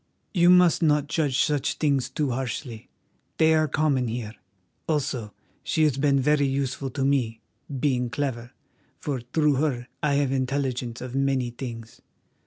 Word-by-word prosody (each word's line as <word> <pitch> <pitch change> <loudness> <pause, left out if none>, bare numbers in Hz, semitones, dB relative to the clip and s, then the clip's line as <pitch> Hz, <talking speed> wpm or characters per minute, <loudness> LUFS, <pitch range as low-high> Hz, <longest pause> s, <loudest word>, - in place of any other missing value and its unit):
You 175 -2 +5
must 180 -1 +5
not 150 -3 +3
judge 145 -3 +1
such 145 -2 0
things 140 -4 +1
too 140 0 -1
harshly; 120 -2 -5 0.5
they 160 0 +5
are 155 0 +3
common 140 -4 +1
here. 115 -1 -4 0.6
Also, 135 -8 -1 0.3
she 160 - +1
has 145 -4 +2
been 140 -1 +3
very 145 +1 +3
useful 135 0 -2
to 135 +1 -2
me, 125 -5 +1 0.4
being 125 -3 +1
clever, 125 -3 -3 0.5
for 140 -4 -3
through 150 -2 +3
her 130 -4 -1
I 145 -2 +1
have 140 -2 +1
intelligence 130 -2 -2
of 125 0 -6
many 135 -2 0
things. 115 -2 -8
135 Hz, 150 wpm, -25 LUFS, 125-150 Hz, 0.6 s, You